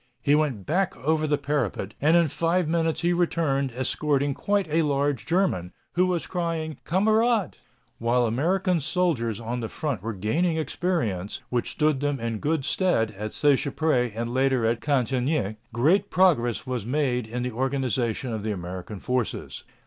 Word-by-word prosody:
He 145 - +3
went 145 -10 +1
back 185 +5 0
over 155 +5 0
the 145 -1 +2
parapet, 140 -9 -2
and 160 +4 +5
in 170 -2 +4
five 170 +3 0
minutes 165 0 0
he 175 +1 +2
returned 160 -6 +1
escorting 140 +2 0
quite 200 +5 0
a 160 +2 +2
large 145 -3 0
German, 165 - 0 0.2
who 180 +1 +3
was 180 -2 -1
crying: 165 -3 -3
"Kamerad." 215 +2 +2 0.5
While 120 +1 +2
American 170 - +1
soldiers 140 - 0
on 120 +2 -3
the 115 - -3
front 140 - -3
were 115 +2 -3
gaining 160 - 0
experience, 140 - -2
which 120 -1 -1
stood 150 -3 +1
them 145 -1 -1
in 115 -2 -3
good 150 0 0
stead 175 - +1
at 105 +1 -6
Seicheprey 140 -3 +2
and 115 +1 -3
later 130 -2 +2
at 115 +1 +1
Cantigny, 130 -4 0
great 145 - +2
progress 145 - +2
was 125 -4 -3
made 125 -1 0
in 120 +2 -3
the 125 - -2
organization 130 -1 -1
of 110 - -3
the 110 +1 -2
American 90 +2 -6
forces. 125 0 -3
140 Hz, 160 wpm, -25 LUFS, 120-165 Hz, 0.5 s, and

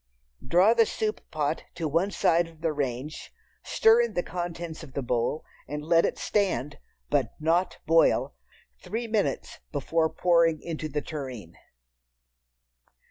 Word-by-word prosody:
Draw 180 - +5
the 230 -2 +4
soup 215 -1 -2
pot 155 0 -2
to 165 -2 -2
one 165 +6 +1
side 170 -3 +2
of 165 -1 -17
the 165 -2 0
range, 140 +1 -4 0.3
stir 450 +1 +4
in 475 - -2
the 175 - 0
contents 170 -2 -5
of 150 -5 -11
the 140 - -3
bowl, 125 +5 -1 0.2
and 150 +2 -5
let 165 +1 +4
it - - -2
stand—but 145 - -2
not 165 +4 +1
boil—three - - 0
minutes 215 -2 -1
before 165 -1 0
pouring 170 -3 +3
into 155 -1 -5
the 150 +1 -2
tureen. 130 - -7
165 Hz, 135 wpm, -27 LUFS, 150-180 Hz, 0.3 s, Draw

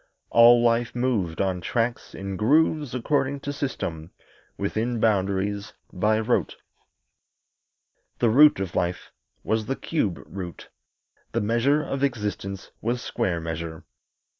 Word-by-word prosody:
All 120 +1 +7
life 120 0 +2
moved 110 -10 0
on 95 -2 -1
tracks, 115 +6 -2
in 95 0 -5
grooves, 145 - +2
according 135 +2 0
to 145 - -4
system, 85 - -4 0.5
within 110 +4 -1
boundaries, 100 -1 0 0.2
by 105 +4 +2
rote. 115 +2 0 1.6
The 115 - +2
root 145 0 +7
of 95 -3 -3
life 90 0 -2 0.3
was 110 -1 -1
the 135 - -1
cube 110 - -1
root; 90 -3 -8 0.6
the 115 - +1
measure 120 +8 +2
of 135 -2 -3
existence 105 -6 -3
was 120 +2 -1
square 85 -2 -1
measure. 80 0 -5
110 Hz, 120 wpm, -25 LUFS, 95-125 Hz, 1.6 s, All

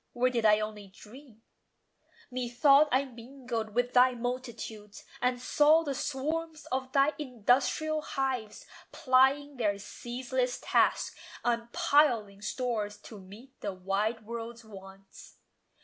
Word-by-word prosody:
Or 250 +1 +2
did 230 -3 +2
I 210 0 +5
only 215 -1 -5
dream? 225 +4 -16 0.9
Methought 265 +4 +4
I 265 +2 +2
mingled 240 -3 -6
with 245 0 0
thy 250 0 +5
multitudes, 235 -4 -6 0.2
And 250 0 +1
saw 300 +5 +4
the 285 -3 -2
swarms 310 +4 -3
of 260 0 -2
thy 275 +2 +3
industrial 265 +4 +1
hives 260 -7 -3 0.3
Plying 280 -1 +2
their 205 -4 0
ceaseless 250 +4 -3
task, - - +1 0.3
and 235 0 -1
piling 270 - +2
stores 215 -2 -3
To 215 - -11
meet 215 +8 -15
the 200 - -3
wide 200 +4 -2
world's 235 +1 -7
wants. 195 -2 -14
245 Hz, 120 wpm, -30 LUFS, 215-270 Hz, 0.9 s, I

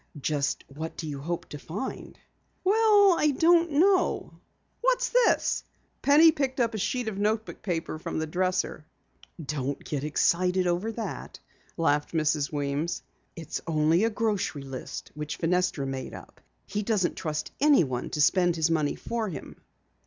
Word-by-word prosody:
"Just 145 0 -1
what 155 +4 -7
do 160 - -5
you 145 -2 -5
hope 170 +3 -4
to 150 - -7
find?" 190 - -6 0.5
"Well, 410 -2 +5
I 300 - +4
don't 335 -1 +4
know. 370 +5 +2 0.4
What's - - +2
this?" - - +2 0.4
Penny 310 +3 +7
picked 275 -4 -2
up 230 -2 +1
a 215 - -3
sheet 245 +4 -1
of 205 -3 -3
notebook 215 +1 -1
paper 165 -4 -3
from - - -4
the 160 - -1
dresser. 180 0 -1 0.6
"Don't 145 -3 -4
get 145 -2 -3
excited 180 +4 +2
over 180 +6 0
that," 225 0 -6 0.4
laughed 150 -3 +1
Mrs. 155 -2 +1
Weems. 145 +3 -2 0.3
"It's 165 -2 -5
only 160 +3 +3
a 225 - +3
grocery 210 -10 -1
list 135 -1 -7
which 150 0 -5
Fenestra 180 -4 0
made 135 -1 -5
up. - - -13 0.2
He 210 - -3
doesn't 205 -4 +1
trust 155 -3 -3
anyone 165 - +3
to 150 - -1
spend 175 +3 +3
his 160 0 +1
money 155 -3 +1
for 230 -3 -3
him." 150 -7 -9
175 Hz, 150 wpm, -27 LUFS, 150-230 Hz, 0.6 s, Penny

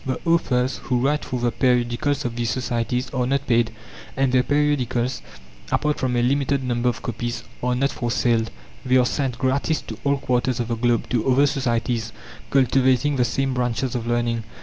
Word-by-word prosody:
The 130 -1 -2
authors 130 -6 +1
who 125 - +1
write 145 +4 +1
for 125 - -3
the 120 0 +1
periodicals 125 +4 +1
of 120 -1 -3
these 120 -1 -1
societies 125 0 -1
are 125 -2 0
not 140 +1 0
paid, 115 -2 +2 0.5
and 135 -1 +2
the 130 0 +4
periodicals, 130 -4 0 0.5
apart 150 -1 +1
from 130 -1 0
a 120 - +2
limited 140 +1 +1
number 125 -1 +1
of 120 - -5
copies, 120 0 -4 0.2
are 125 0 0
not 135 +2 +1
for 120 - -3
sale; 115 -1 +2 0.4
they 130 0 +3
are 125 - +4
sent 130 -2 -1
gratis 140 +5 0
to 110 0 -9
all 140 0 +2
quarters 125 -2 0
of 120 -1 -2
the 115 - 0
globe, 120 0 +1
to 120 0 0
other 135 +3 +5
societies, 120 -4 -1 0.4
cultivating 130 +1 +3
the 125 - +3
same 135 +3 -1
branches 125 0 -1
of 120 -1 -3
learning. 120 -1 0
125 Hz, 190 wpm, -23 LUFS, 120-135 Hz, 0.5 s, other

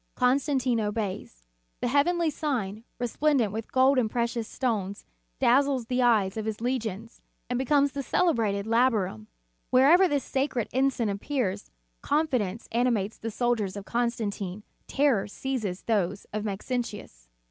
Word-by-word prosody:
Constantine 255 -1 +2
obeys. 205 - -4 0.4
The - - -1
heavenly 315 +5 +2
sign, 230 -9 -3
resplendent 245 -2 +1
with 220 +1 -6
gold 260 +1 +4
and 225 -3 +1
precious 235 -1 -1
stones, 210 -7 -2 0.3
dazzles 270 0 +3
the 250 +2 0
eyes 220 -5 +3
of 215 - -3
his 220 -1 -3
legions, 230 -3 -3 0.3
and 245 - 0
becomes 280 +1 +3
the 280 +1 -4
celebrated 225 - +1
Labarum. 220 - +1 0.4
Wherever 300 +9 +6
this 290 -4 0
sacred 265 -4 -1
ensign 260 -3 +1
appears, 200 - -2 0.3
confidence 250 -9 0
animates 230 -3 0
the 225 - -4
soldiers 220 -4 -1
of 200 - -7
Constantine, 215 -5 -2 0.2
terror 275 -8 +2
seizes 215 -5 -4
those 200 -3 0
of 210 0 -2
Maxentius. 205 - -5
235 Hz, 130 wpm, -27 LUFS, 205-265 Hz, 0.4 s, Wherever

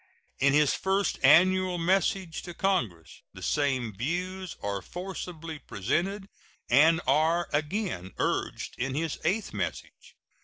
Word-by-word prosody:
In 135 0 +4
his 150 -1 +4
first 195 +1 0
annual 185 +5 +5
message 185 0 0
to 175 -1 -9
Congress 115 - -1
the - - -9
same 130 -7 0
views 180 - -3
are 100 -1 -2
forcibly 170 - -7
presented, 180 - -2 0.4
and 160 +6 +5
are 160 +5 +2
again 150 - -2
urged - - -2
in 130 +1 -2
his 160 0 -2
eighth 195 +7 0
message. - - -5
165 Hz, 120 wpm, -28 LUFS, 135-185 Hz, 0.4 s, annual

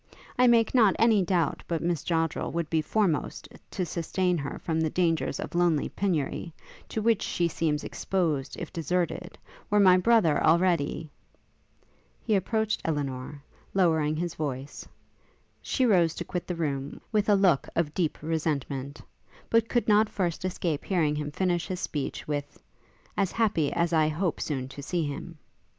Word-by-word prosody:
I 250 0 +5
make 230 -2 +4
not 220 -7 +5
any 225 -3 +4
doubt 175 -3 0
but 165 -1 -1
Miss 170 -3 -1
Joddrel 165 -2 -1
would 165 -2 -2
be 160 -1 +2
foremost 175 -1 -1 0.2
to 185 - -2
sustain 180 +2 -1
her 140 0 -5
from 160 -2 -1
the 160 - +1
dangers 165 -1 0
of - - -5
lonely 170 -3 +2
penury, 170 -3 -2 0.3
to 220 - -3
which 230 -2 +3
she 175 - 0
seems 155 -2 -1
exposed 160 -8 -2
if - - -7
deserted, 175 +1 -2 0.3
were 210 - +3
my 185 -2 +7
brother 185 -7 +3
already 165 -2 +2 0.6
' - - -37
He 220 - +1
approached 220 +3 0
Elinor, 140 -2 -3 0.3
lowering 160 -5 +3
his 170 +1 -2
voice; 140 -2 -5 0.7
she 260 - 0
rose 175 -8 +3
to - - -5
quit 180 -2 -4
the 180 - -2
room, 145 -4 -3
with 215 -1 +1
a 205 - +6
look 185 -8 +3
of 155 -3 0
deep 170 -5 0
resentment; 145 -3 -2 0.5
but 230 0 +3
could 240 - +1
not 215 0 +4
first 175 -4 -2
escape 175 -5 -2
hearing 160 -6 +1
him 150 0 -3
finish 175 +2 -1
his 185 -2 -4
speech 145 -6 -4
with 145 -1 -4 0.6
'as 195 -2 +1
happy 205 -10 +1
as 170 0 0
I 155 -1 +4
hope 165 +3 -1
soon 130 -4 -2
to 140 - -9
see 170 +4 -1
him!' 145 -1 -6
170 Hz, 165 wpm, -27 LUFS, 150-190 Hz, 0.7 s, my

